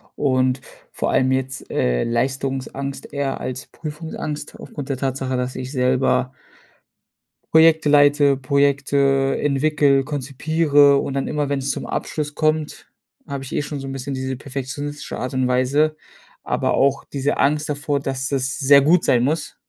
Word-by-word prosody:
Und 130 Hz, -2 st, +1 dB, 0.3 s
vor -, -, -2 dB
allem 130 Hz, 0 st, +2 dB
jetzt, 130 Hz, 0 st, -3 dB
äh, -, -, 0 dB
Leistungsangst 135 Hz, +3 st, -3 dB
eher 140 Hz, -1 st, -2 dB
als 130 Hz, 0 st, -4 dB
Prüfungsangst 155 Hz, -1 st, -6 dB
aufgrund 140 Hz, -2 st, -8 dB
der 135 Hz, -, -1 dB
Tatsache, 130 Hz, -1 st, -2 dB
dass 125 Hz, 0 st, -2 dB
ich 130 Hz, 0 st, -5 dB
selber 130 Hz, 0 st, +1 dB, 1.2 s
Projekte 160 Hz, -1 st, +6 dB
leite, 145 Hz, -1 st, +5 dB
Projekte 140 Hz, 0 st, +1 dB
entwickle, 145 Hz, -1 st, +2 dB
konzipiere 145 Hz, +1 st, +2 dB
und 135 Hz, -, -2 dB
dann 135 Hz, -, -2 dB
immer, 150 Hz, -2 st, -1 dB
wenn's 140 Hz, -1 st, -1 dB
zum -, -, -2 dB
Abschluss 150 Hz, -1 st, -3 dB
kommt, 155 Hz, 0 st, -1 dB, 0.4 s
habe 140 Hz, -1 st, -5 dB
ich 130 Hz, -, -8 dB
eh -, -, 0 dB
schon 145 Hz, -1 st, -5 dB
so 135 Hz, -, -7 dB
'n -, -, -5 dB
bisschen 135 Hz, 0 st, -5 dB
diese 130 Hz, 0 st, -3 dB
perfektionistische 140 Hz, +2 st, -6 dB
Art 130 Hz, +1 st, -4 dB
und 130 Hz, -1 st, +1 dB
Weise, 140 Hz, +5 st, +2 dB, 0.5 s
aber -, -, -1 dB
auch 140 Hz, 0 st, +2 dB
diese 140 Hz, +1 st, 0 dB
Angst 150 Hz, +1 st, +1 dB
davor, 145 Hz, 0 st, -1 dB
dass 135 Hz, 0 st, -3 dB
das 130 Hz, 0 st, -1 dB
sehr 140 Hz, -1 st, +6 dB
gut 165 Hz, +5 st, +3 dB
sein 120 Hz, -1 st, +3 dB
muss. 155 Hz, +3 st, -1 dB
140 Hz, 150 wpm, -21 LUFS, 130-145 Hz, 1.2 s, Projekte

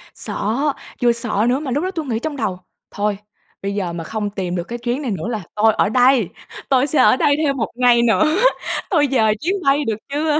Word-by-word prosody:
Sợ, 210 Hz, +2 st, -3 dB, 0.5 s
vừa 240 Hz, -, +5 dB
sợ 230 Hz, -2 st, -1 dB
nữa 255 Hz, +2 st, +1 dB
mà 290 Hz, -3 st, -4 dB
lúc 290 Hz, +6 st, 0 dB
đó 370 Hz, -, -2 dB
tui 325 Hz, -5 st, -4 dB
nghĩ 230 Hz, -4 st, -2 dB
trong 305 Hz, +4 st, -4 dB
đầu: 195 Hz, -7 st, -2 dB, 0.3 s
"Thôi, 205 Hz, 0 st, -1 dB, 0.4 s
bây 200 Hz, 0 st, -3 dB
giờ 185 Hz, -4 st, -2 dB
mà 170 Hz, -1 st, -5 dB
không 210 Hz, +3 st, -3 dB
tìm 185 Hz, -3 st, -4 dB
được 175 Hz, -, -2 dB
cái 240 Hz, +6 st, -6 dB
chuyến 245 Hz, +4 st, -2 dB
này 255 Hz, -, -3 dB
nữa 190 Hz, +1 st, -3 dB
là 220 Hz, -5 st, -3 dB
tôi 220 Hz, +1 st, +4 dB
ở 205 Hz, -, +1 dB
đây, 250 Hz, -4 st, +4 dB, 0.4 s
tôi 265 Hz, 0 st, +3 dB
sẽ 300 Hz, -1 st, 0 dB
ở 255 Hz, -, +6 dB
đây 285 Hz, -, +3 dB
thêm 290 Hz, -3 st, 0 dB
1 225 Hz, -, -2 dB
ngày 245 Hz, -1 st, +4 dB
nữa, 235 Hz, +4 st, +3 dB, 0.7 s
tôi 300 Hz, -7 st, +3 dB
dời 220 Hz, -4 st, +3 dB
chuyến 360 Hz, +6 st, 0 dB
bay 280 Hz, +1 st, +2 dB
được 220 Hz, -3 st, -1 dB
chưa?" 300 Hz, +1 st, +1 dB
240 Hz, 230 wpm, -19 LUFS, 210-275 Hz, 0.7 s, ở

